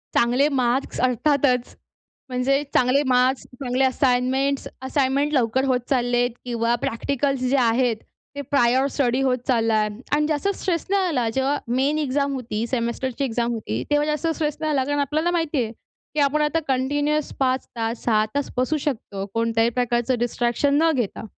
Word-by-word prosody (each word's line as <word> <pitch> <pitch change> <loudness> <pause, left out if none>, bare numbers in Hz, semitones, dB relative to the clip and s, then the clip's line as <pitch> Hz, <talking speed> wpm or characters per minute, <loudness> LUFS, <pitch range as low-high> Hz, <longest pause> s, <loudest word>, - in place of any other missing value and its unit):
चांगले 250 +4 +3
मार्क्स 260 -1 0
अर्थातच, 255 0 +1 0.5
म्हणजे 265 +3 +1
चांगले 255 +3 +3
मार्क्स, 255 +1 +2
चांगले 255 0 -2
असाइनमेंट्स. 265 +1 +1 0.2
असाइनमेंट 275 +1 +1
लवकर 260 0 +2
होत 255 -2 +2
चाललेत 245 -2 +2 0.2
किंवा 235 -1 0
प्रॅक्टिकल्स 275 +3 -1
जे 275 - +2
आहेत, 240 -1 +2 0.4
ते 285 - -3
प्रायर 260 -1 +2
स्टडी 255 -2 +1
होत 260 -2 +2
चाललाय 225 -3 +2 0.3
आणि 300 0 +1
जास्त 305 +3 -1
स्ट्रेस 340 -4 -2
नाही 390 -1 +2
आला. 255 -9 0
जेव्हा 265 +3 +1
मेन 265 +5 +1
एक्झाम 280 -1 0
होती, 230 -4 -3
सेमेस्टरची 255 +2 -2
एक्झाम 235 -1 -1
होती, 125 - -3
तेव्हा 295 0 +3
जास्त 300 +1 -1
स्ट्रेस 310 -2 -1
नाही 310 -1 -1
आला 270 -2 +2
कारण 290 +1 -1
आपल्याला 305 +5 0
माहिती 325 -6 0
आहे 220 - -5 0.4
की - - 0
आपण 290 +1 +2
आता 300 +2 +1
कंटिन्युअस 290 +3 0
5 260 -1 +1
तास 230 0 -3
6 215 -2 +2
तास 285 -1 -1
बसू 255 +5 +1
शकतो. 220 -9 -4
कोणत्याही 230 0 +1
प्रकारचं 240 +1 0
डिस्ट्रॅक्शन 240 +3 0
न 325 0 +4
घेता. 235 -4 -2
260 Hz, 160 wpm, -23 LUFS, 240-285 Hz, 0.5 s, न